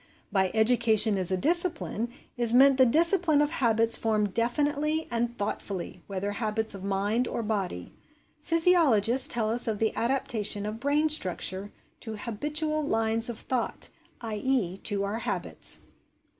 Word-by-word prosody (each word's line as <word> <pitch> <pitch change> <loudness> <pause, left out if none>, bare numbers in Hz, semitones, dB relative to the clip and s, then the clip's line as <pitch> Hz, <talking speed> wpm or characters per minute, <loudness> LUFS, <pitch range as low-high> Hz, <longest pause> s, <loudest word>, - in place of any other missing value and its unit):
By 190 -2 +1
EDUCATION 220 -2 +3
IS 185 -1 +1
A 185 - 0
DISCIPLINE, 315 - +1 0.2
is 240 -1 +2
meant 270 +1 +5
the 260 - +6
discipline 335 +2 +3
of 295 +1 +1
habits 230 -5 +3
formed 210 -3 -1
definitely 295 +6 0
and 235 0 -3
thoughtfully, 195 -3 -5
whether 200 +1 -4
habits 220 +1 -2
of 195 -1 -9
mind 200 +5 -1
or 235 - -4
body. 195 - -4 0.5
Physiologists 300 - +3
tell 220 -2 -1
us 240 +1 +2
of 220 -2 -1
the 220 +1 -1
adaptation 235 -5 -2
of 215 +1 -6
brain 290 +4 +1
structure 190 - -1 0.3
to 220 -1 -8
habitual 300 +8 -2
lines 225 -3 +2
of 235 - -5
thought 250 0 -3 0.3
i.e., 220 -3 -2
to 200 0 -3
our 205 +3 -4
habits. - - +3
230 Hz, 145 wpm, -26 LUFS, 205-275 Hz, 0.5 s, the